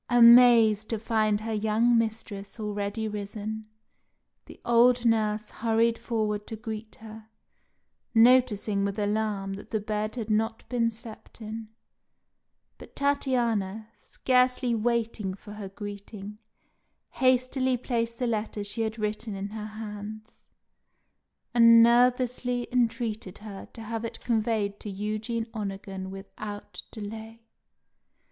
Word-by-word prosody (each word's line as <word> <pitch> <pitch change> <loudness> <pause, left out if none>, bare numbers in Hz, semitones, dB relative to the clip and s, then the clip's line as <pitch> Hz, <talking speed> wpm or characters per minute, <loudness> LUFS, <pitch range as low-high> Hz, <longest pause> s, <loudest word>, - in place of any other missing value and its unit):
Amazed 235 -3 +7
to 225 - 0
find 215 -1 +1
her 225 0 -3
young 220 +3 +2
mistress 220 -2 -2
already 210 +1 -3
risen, 215 +1 -5 0.8
the - - -13
old 240 +1 +4
nurse 215 -2 +1
hurried 230 +1 +1
forward 210 -3 -2
to 225 - -5
greet 220 -1 -7
her, 220 0 -11 0.9
noticing 225 -4 +4
with 200 +1 -2
alarm 205 -2 -1
that 200 - -9
the 220 - -1
bed 215 +1 -3
had 225 -3 -3
not 225 +1 -1
been 235 -2 +1
slept 225 0 -11
in; 220 0 -6 1.1
but - - -14
Tatiana, 235 -7 0
scarcely 250 -1 +1
waiting 225 -3 -1
for 205 +1 -12
her 205 -2 -7
greeting, 205 +1 -8 0.7
hastily 255 0 +2
placed 230 -2 -2
the 250 - -1
letter 215 -2 -2
she 205 +3 -2
had 220 0 -2
written 215 0 -3
in 195 +1 -4
her 215 0 -6
hands, 215 0 -9 1.0
and 230 -1 +8
nervously 245 +1 +2
entreated 230 -5 -1
her 205 -2 -9
to 225 - -8
have 225 +1 -4
it 230 - -5
conveyed 215 -3 0
to 210 - -6
Eugene 215 +3 -3
Onegin 195 -3 -5
without 205 +2 -8
delay. 220 +1 -8
220 Hz, 120 wpm, -27 LUFS, 210-235 Hz, 1.1 s, and